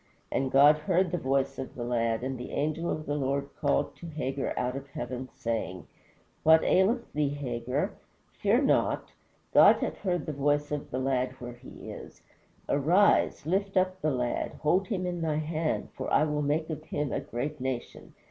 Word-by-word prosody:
And 135 Hz, 0 st, 0 dB
God 145 Hz, +2 st, +7 dB
heard 180 Hz, +2 st, +1 dB
the 175 Hz, -, -1 dB
voice 135 Hz, 0 st, 0 dB
of 130 Hz, -, -6 dB
the 120 Hz, -, -4 dB
lad, 115 Hz, -1 st, 0 dB
and 130 Hz, 0 st, -2 dB
the 125 Hz, -, -6 dB
angel 155 Hz, +3 st, -1 dB
of 155 Hz, -, -3 dB
the 145 Hz, -, -2 dB
Lord 140 Hz, 0 st, -1 dB
called 145 Hz, -, 0 dB
to 170 Hz, -, -9 dB
Hagar 140 Hz, -4 st, -3 dB
out 125 Hz, +1 st, -1 dB
of 135 Hz, 0 st, -6 dB
heaven, 130 Hz, 0 st, -5 dB
saying, 110 Hz, -6 st, -3 dB, 0.6 s
What 160 Hz, 0 st, +6 dB
aileth 230 Hz, +6 st, +2 dB
thee, 150 Hz, -1 st, +1 dB
Hagar? 135 Hz, -, -2 dB, 0.4 s
fear -, -, +2 dB
not. -, -, +1 dB, 0.4 s
God -, -, +8 dB
hath -, -, -3 dB
heard 175 Hz, -6 st, -1 dB
the 155 Hz, -, -3 dB
voice 145 Hz, +1 st, +1 dB
of 150 Hz, -1 st, -3 dB
the 130 Hz, -, -3 dB
lad 130 Hz, -1 st, 0 dB
where 120 Hz, -2 st, -8 dB
he 120 Hz, +1 st, -10 dB
is. -, -, -11 dB, 0.4 s
Arise, 170 Hz, +4 st, +3 dB
lift 195 Hz, +4 st, 0 dB
up 185 Hz, 0 st, +1 dB
the 155 Hz, -, +2 dB
lad, 125 Hz, -3 st, -1 dB
hold 180 Hz, +5 st, +2 dB
him 185 Hz, -3 st, -2 dB
in 175 Hz, -1 st, -3 dB
thy 160 Hz, -2 st, 0 dB
hand, 155 Hz, +1 st, -1 dB
for -, -, -4 dB
I -, -, +5 dB
will 150 Hz, -1 st, 0 dB
make 155 Hz, +3 st, 0 dB
of 155 Hz, 0 st, -5 dB
him 145 Hz, -3 st, -2 dB
a -, -, 0 dB
great 145 Hz, +5 st, -4 dB
nation. 130 Hz, -2 st, -5 dB
145 Hz, 185 wpm, -29 LUFS, 130-160 Hz, 0.6 s, God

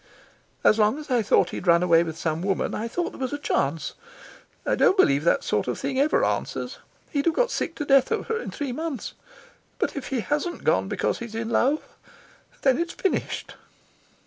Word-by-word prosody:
"As 215 Hz, -, +5 dB
long 215 Hz, +5 st, +3 dB
as 300 Hz, -3 st, -8 dB
I 245 Hz, -2 st, +3 dB
thought 210 Hz, -, +3 dB
he'd 190 Hz, -, -6 dB
run 170 Hz, 0 st, +5 dB
away 170 Hz, -2 st, +5 dB
with 160 Hz, -1 st, -6 dB
some 160 Hz, 0 st, -2 dB
woman 195 Hz, 0 st, -1 dB
I 225 Hz, -, -2 dB
thought 345 Hz, +8 st, -2 dB
there -, -, -12 dB
was 260 Hz, +1 st, -2 dB
a -, -, -1 dB
chance. 155 Hz, -, -1 dB, 0.7 s
I -, -, +1 dB
don't 380 Hz, -, +4 dB
believe 140 Hz, -, +4 dB
that 270 Hz, -, +3 dB
sort -, -, 0 dB
of -, -, -1 dB
thing 265 Hz, -, -2 dB
ever 295 Hz, +3 st, +3 dB
answers. -, -, -3 dB, 0.3 s
He'd 285 Hz, -3 st, 0 dB
have 330 Hz, -, +2 dB
got -, -, +2 dB
sick 330 Hz, -, -2 dB
to 295 Hz, -, -4 dB
death 275 Hz, -2 st, +5 dB
of -, -, -1 dB
her 450 Hz, 0 st, -1 dB
in -, -, -6 dB
three 285 Hz, -3 st, -4 dB
months. 305 Hz, -1 st, -4 dB, 0.6 s
But -, -, -1 dB
if 275 Hz, -3 st, -5 dB
he 260 Hz, -4 st, -1 dB
hasn't 300 Hz, +8 st, -2 dB
gone -, -, +2 dB
because -, -, -1 dB
he's 235 Hz, -2 st, -7 dB
in 225 Hz, 0 st, -3 dB
love, 270 Hz, +6 st, +2 dB, 0.8 s
then 265 Hz, +1 st, +4 dB
it's 340 Hz, 0 st, -2 dB
finished." 385 Hz, -, -2 dB
260 Hz, 205 wpm, -25 LUFS, 210-305 Hz, 0.8 s, As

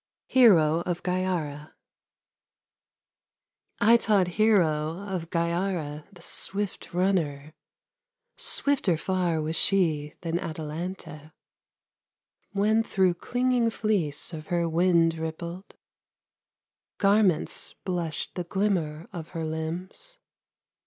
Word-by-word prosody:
HERO, 170 Hz, -11 st, +5 dB
OF 175 Hz, -1 st, -2 dB
GYARA 175 Hz, -5 st, -2 dB, 2.0 s
I 230 Hz, +3 st, +6 dB
taught 200 Hz, -6 st, +2 dB
Hero, 170 Hz, -6 st, +2 dB
of 180 Hz, -4 st, -4 dB
Gyara, 170 Hz, -3 st, -1 dB
the 175 Hz, -3 st, -16 dB
swift 200 Hz, +2 st, -3 dB
runner; 160 Hz, -6 st, 0 dB, 0.8 s
Swifter 255 Hz, -, 0 dB
far 180 Hz, -2 st, 0 dB
was 160 Hz, +1 st, -1 dB
she 160 Hz, -6 st, +1 dB
than 170 Hz, 0 st, -1 dB
Atalanta, 160 Hz, -2 st, -6 dB, 1.2 s
When 215 Hz, +2 st, +2 dB
through 190 Hz, -5 st, +2 dB
clinging 245 Hz, +5 st, +1 dB
fleece 195 Hz, -10 st, -1 dB
of 155 Hz, -1 st, -7 dB
her 170 Hz, -2 st, 0 dB
wind 165 Hz, -1 st, +3 dB
rippled 170 Hz, +3 st, -6 dB, 1.2 s
Garments 200 Hz, -4 st, +2 dB
blushed 175 Hz, -4 st, -2 dB
the 180 Hz, -, -3 dB
glimmer 170 Hz, -4 st, -1 dB
of 165 Hz, -3 st, -7 dB
her 165 Hz, -, -2 dB
limbs. 175 Hz, -, -5 dB
175 Hz, 90 wpm, -27 LUFS, 160-195 Hz, 2.0 s, I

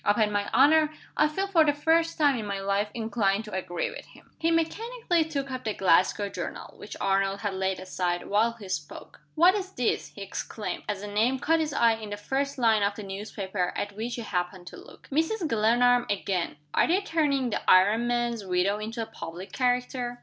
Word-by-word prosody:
Upon 210 Hz, +1 st, +2 dB
my 205 Hz, 0 st, -1 dB
honor, 305 Hz, +3 st, +5 dB, 0.2 s
I 305 Hz, -, +4 dB
feel 385 Hz, +6 st, -2 dB
for 365 Hz, -5 st, +4 dB
the 295 Hz, -1 st, +2 dB
first 325 Hz, +2 st, +2 dB
time 290 Hz, -4 st, +4 dB
in 210 Hz, -, -5 dB
my 200 Hz, -1 st, -3 dB
life 200 Hz, +1 st, 0 dB
inclined 220 Hz, -3 st, 0 dB
to 210 Hz, -, -10 dB
agree 175 Hz, -2 st, -2 dB
with -, -, -9 dB
him." -, -, -19 dB
He 330 Hz, -, +1 dB
mechanically 350 Hz, +3 st, 0 dB
took 280 Hz, -4 st, -4 dB
up 255 Hz, 0 st, -5 dB
the 215 Hz, -2 st, -2 dB
Glasgow 190 Hz, +3 st, +3 dB
journal, -, -, -6 dB
which -, -, -8 dB
Arnold 195 Hz, 0 st, +1 dB
had 205 Hz, -2 st, -2 dB
laid 190 Hz, 0 st, -1 dB
aside, 180 Hz, -1 st, -2 dB
while 220 Hz, +3 st, +2 dB
he 220 Hz, -4 st, -11 dB
spoke. 150 Hz, -4 st, -6 dB
"What's 370 Hz, +3 st, +4 dB
this!" 245 Hz, -2 st, 0 dB
he 200 Hz, -, -9 dB
exclaimed, 205 Hz, +2 st, -5 dB
as 205 Hz, -1 st, -3 dB
a -, -, -5 dB
name 220 Hz, +6 st, +1 dB
caught 325 Hz, +4 st, +2 dB
his 310 Hz, -1 st, -1 dB
eye 235 Hz, -4 st, +4 dB
in 215 Hz, -2 st, -8 dB
the 205 Hz, -, -4 dB
first 275 Hz, +6 st, -2 dB
line 225 Hz, -4 st, +3 dB
of 200 Hz, 0 st, +1 dB
the 210 Hz, -, -7 dB
newspaper 195 Hz, -2 st, -4 dB
at 205 Hz, 0 st, -4 dB
which 230 Hz, +3 st, -4 dB
he 235 Hz, -, -5 dB
happened 180 Hz, -2 st, -3 dB
to -, -, -12 dB
look. -, -, -15 dB
"Mrs. 325 Hz, +6 st, 0 dB
Glenarm 240 Hz, +1 st, +3 dB
again! 190 Hz, -5 st, -1 dB, 0.2 s
Are -, -, +3 dB
they 365 Hz, +4 st, +2 dB
turning 290 Hz, -, 0 dB
the -, -, -1 dB
iron 205 Hz, +6 st, +5 dB
master's 240 Hz, -2 st, -1 dB
widow 190 Hz, +2 st, +1 dB
into 225 Hz, +2 st, -4 dB
a -, -, -5 dB
public 185 Hz, -4 st, -8 dB
character?" 250 Hz, -1 st, -1 dB
225 Hz, 205 wpm, -27 LUFS, 200-280 Hz, 0.2 s, honor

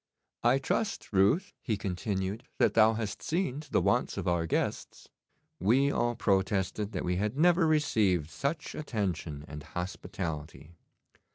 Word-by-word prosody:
I 135 Hz, -, +4 dB
trust, 135 Hz, -, -2 dB
Ruth,' 100 Hz, -, +3 dB
he 110 Hz, -4 st, -1 dB
continued, 95 Hz, +3 st, -3 dB
'that -, -, +3 dB
thou 110 Hz, 0 st, +6 dB
hast 110 Hz, -3 st, -4 dB
seen 160 Hz, -5 st, -1 dB
to 150 Hz, -, -11 dB
the -, -, +2 dB
wants -, -, +1 dB
of -, -, -3 dB
our 85 Hz, -2 st, +1 dB
guests.' -, -, -2 dB, 0.5 s
We 130 Hz, +9 st, +3 dB
all 120 Hz, -2 st, 0 dB
protested 100 Hz, 0 st, 0 dB
that -, -, -2 dB
we 90 Hz, 0 st, 0 dB
had 105 Hz, +6 st, -1 dB
never 170 Hz, +1 st, +4 dB
received 100 Hz, -, +2 dB
such 150 Hz, +3 st, -3 dB
attention 95 Hz, -, -3 dB
and 75 Hz, +1 st, -7 dB
hospitality. 85 Hz, -2 st, -5 dB
105 Hz, 145 wpm, -30 LUFS, 90-135 Hz, 0.5 s, thou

